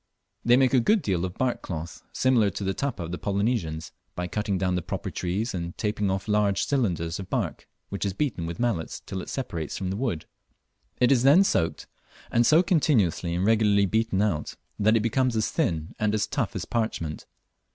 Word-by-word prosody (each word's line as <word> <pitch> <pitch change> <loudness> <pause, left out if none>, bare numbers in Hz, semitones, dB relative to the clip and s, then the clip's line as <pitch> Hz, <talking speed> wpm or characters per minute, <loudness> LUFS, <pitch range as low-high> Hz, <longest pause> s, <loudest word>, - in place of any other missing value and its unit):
They 120 +1 +5
make 130 -1 +3
a 130 - +6
good 205 - +3
deal 95 -5 0
of 90 - -6
bark 130 -1 0
cloth, 85 -1 -6
similar 125 -5 +3
to 100 - -5
the 95 0 0
tapa 135 -8 -3
of 85 - -6
the 90 - -4
Polynesians, 100 -6 -1 0.2
by 90 - -2
cutting 100 +1 -1
down 90 0 0
the 90 - 0
proper - - -4
trees 95 +6 -2
and 85 -1 -5
taping 105 -2 -1
off 95 +1 -2
large 105 -2 +2
cylinders 90 - 0
of 95 - -7
bark, - - -2 0.2
which 100 - -4
is 100 -2 -1
beaten 105 - -2
with 85 - -6
mallets 115 -10 -1
till 95 - -5
it - - -8
separates 85 - -4
from 95 -1 -3
the - - -2
wood. 105 -9 -2 0.7
It 125 +1 +4
is 130 -3 +4
then 145 +9 +7
soaked, 80 - 0 0.5
and 120 0 +3
so 160 +4 +6
continuously 110 - +2
and 90 +2 0
regularly 105 -2 +4
beaten 110 0 +1
out 85 -8 -1 0.2
that 110 +2 +4
it - - +1
becomes 125 +2 +1
as 110 -1 0
thin 85 - -1
and 105 0 +1
as 105 - +1
tough - - -2
as - - -3
parchment. 110 -9 -3
105 Hz, 205 wpm, -26 LUFS, 90-120 Hz, 0.7 s, then